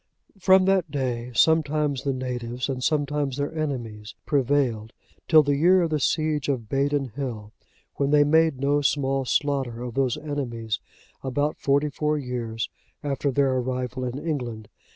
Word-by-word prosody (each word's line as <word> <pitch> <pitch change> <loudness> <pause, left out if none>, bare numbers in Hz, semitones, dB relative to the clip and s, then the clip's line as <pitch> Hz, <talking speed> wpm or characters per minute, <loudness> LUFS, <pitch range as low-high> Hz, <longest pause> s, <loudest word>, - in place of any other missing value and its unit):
From 190 0 +5
that 190 -4 +2
day, 125 -4 -2
sometimes 150 -2 +2
the 140 - -1
natives, 125 -1 -4
and 130 -1 -3
sometimes 145 -2 0
their 145 +3 -3
enemies, 120 -9 -4
prevailed, 130 -5 +1 0.3
till 155 -2 +7
the 145 0 +1
year 180 +5 +5
of 165 - -1
the 155 - +1
siege 155 0 0
of 130 -4 0
Badon 140 -1 0
hill,(91) 115 -6 -5 0.5
when 140 -1 +1
they 145 0 +5
made 160 -1 +3
no 145 +2 +2
small 135 -1 +1
slaughter 130 -4 -1
of 125 -2 -5
those 130 -1 +1
enemies, 125 -8 -3 0.4
about 145 +3 -1
forty 145 +1 +1
four 150 +2 0
years 120 -4 -3 0.4
after 140 0 -1
their 135 0 +2
arrival 130 0 -3
in 125 +1 -3
England. 125 -9 -4
140 Hz, 150 wpm, -25 LUFS, 125-150 Hz, 0.5 s, till